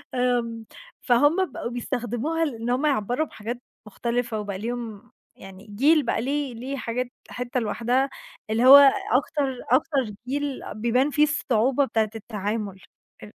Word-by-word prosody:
آمم، 235 -2 0 0.4
فهم 290 +7 +3
بقوا 235 - -5
بيستخدموها 245 +7 -2
لإن 235 -4 -4
هم 255 +5 +1
يعَبّروا 250 +1 +1
بحاجات 235 +3 -6 0.3
مختلفة 235 +1 -2
وبقى 200 -2 -4
ليهم 230 -1 -6 0.3
يعني 195 +1 -13
جيل 285 +9 +3
بقى - - 0
ليه 280 0 -2
ليه 260 +4 -5
حاجات 250 +1 -3 0.2
حتّة 250 0 -3
لوحدها 240 +5 0 0.4
اللي 230 +3 +2
هو 275 +2 +11 0.4
أكتر 270 0 0
أكتر 265 -4 +2 0.2
جيل 285 0 -2
بيبان 240 +6 +1
فيه 300 - +3
الصعوبة 270 -2 +2
بتاعة 220 -2 0
التعامل 210 -2 -4 0.4
أ - - -7
245 Hz, 135 wpm, -25 LUFS, 225-275 Hz, 0.4 s, هو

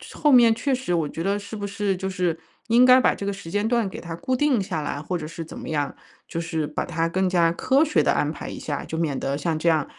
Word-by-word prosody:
后 295 -1 +3
面 235 -3 +6
确 270 +3 -1
实 250 -8 -1
我 160 -3 0
觉 165 - -6
得 200 +3 0
是 205 +2 -7
不 205 0 -4
是 200 -1 -1
就 190 +1 -3
是 180 -3 -1 0.3
应 235 +2 +6
该 255 0 +7
把 - - +3
这 200 - -6
个 200 - -1
时 180 -4 -9
间 205 +2 0
段 230 -4 +1
给 - - -8
它 165 -1 -6
固 260 +8 -3
定 260 -4 +2
下 165 -5 -3
来， 145 0 -4
或 180 +3 -3
者 155 -2 -6
是 165 0 -7
怎 160 - -10
么 - - -8
样， 145 -3 -1 0.3
就 165 - -5
是 160 -2 -2
把 150 - -3
它 165 -1 -1
更 185 +2 +1
加 170 -2 +3
科 265 - +2
学 305 - +2
地 - - +2
安 - - 0
排 - - -8
一 - - -6
下， - - -4
就 160 - -5
免 150 -5 -1
得 140 +1 -2
像 155 +1 -1
这 170 - -1
样， 160 -3 +3
185 Hz, 305 characters per minute, -24 LUFS, 165-225 Hz, 0.3 s, 该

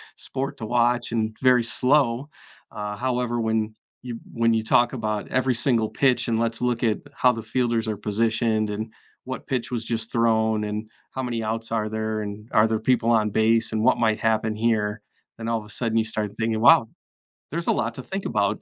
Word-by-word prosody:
sport 135 +1 -5
to 110 - -5
watch 120 +1 +1
and 110 -1 -1
very 125 -2 +5
slow. 125 +2 +2 0.4
Uh, 105 -1 -5
however, 125 0 -1
when 110 -1 0 0.3
you 120 -2 -6 0.2
when 115 0 +2
you 110 -1 +1
talk 120 +3 +3
about 110 -4 -3
every 130 0 +1
single 115 -2 +2
pitch, 130 -3 +1
and 115 -1 +1
let's 115 -1 0
look 125 -1 0
at 110 -3 +2 0.2
how 125 - +4
the 115 -1 -5
fielders 115 -1 0
are 110 - -1
positioned 110 +1 0
and 110 +2 -4 0.3
what 130 0 -6
pitch 125 -4 -2
was 115 -2 -2
just 115 -1 -2
thrown, 110 -2 +2
and 105 +1 -4 0.2
how 130 - -4
many 115 -2 -2
outs 115 +1 -3
are 110 -1 0
there, 110 0 -2
and 105 +2 -8
are 110 - +5
there 110 -1 0
people 120 -1 +2
on 110 -2 +3
base 115 +2 +2
and 110 0 -1
what - - +4
might 110 -2 +2
happen 110 -1 +1
here? 105 -2 0 0.4
Then 115 0 -6
all 115 -1 0
of 105 - -11
a 105 - -14
sudden 115 0 -1
you 110 - +2
start 110 -2 -3
thinking, 110 -1 -1
wow, 115 -1 +6 0.6
there's 170 +2 -2
a - - +4
lot 115 -1 -1
to 130 - -7
think 195 0 -5
about 100 +1 0
115 Hz, 205 wpm, -24 LUFS, 110-120 Hz, 0.6 s, wow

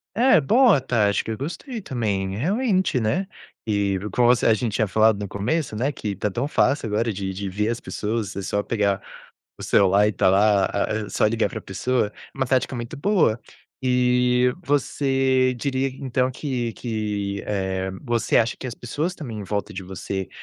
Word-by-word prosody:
É, 240 -5 +5
boa 225 - +5
tá, 120 -5 +2
acho 100 - +1
que - - -8
eu 110 - -4
gostei 220 - -5
também, 100 - -2
realmente, 190 - +1
né. 160 - 0 0.4
E, 100 -2 +1
como 120 +4 +3
você 125 -1 +4
a 115 - +6
gente 110 0 -2
tinha 110 0 +1
falado 110 +1 +3
no 105 - -4
começo, 110 - -2
né, 130 +7 0
que 110 -6 -5
está 100 +1 -2
tão 120 +8 -2
fácil 145 -3 +1
agora 110 +2 0
de 95 0 -3
de 100 +1 -5
ver 105 +3 -1
as 115 0 -2
pessoas, 105 -1 -3
é 100 - -3
só 100 +1 -1
pegar 100 -4 0 0.6
o - - -8
celular 100 +1 +4
e - - +2
estar 95 - +2
lá, 100 +1 +4
ah, 100 - -1 0.2
é - - -10
só - - 0
ligar 115 +1 +1
pra 110 - -6
pessoa. 110 +4 -1
É - - -17
uma 135 - +1
tática 130 0 +1
muito 120 +4 -5
boa. 150 - +2 0.4
E 125 -1 +3
você 135 -2 +1
diria 135 +1 -1
então 130 -1 0
que 125 -4 -3
que, 105 -4 -3
eh, 95 -2 -2
você 120 -3 +1
acha 115 -1 +2
que - - -6
as 120 - -5
pessoas 150 +10 -3
também 125 -11 -7
em 105 - -5
volta 100 +1 -3
de 95 - -6
você 95 +1 -5
115 Hz, 195 wpm, -23 LUFS, 100-130 Hz, 0.6 s, a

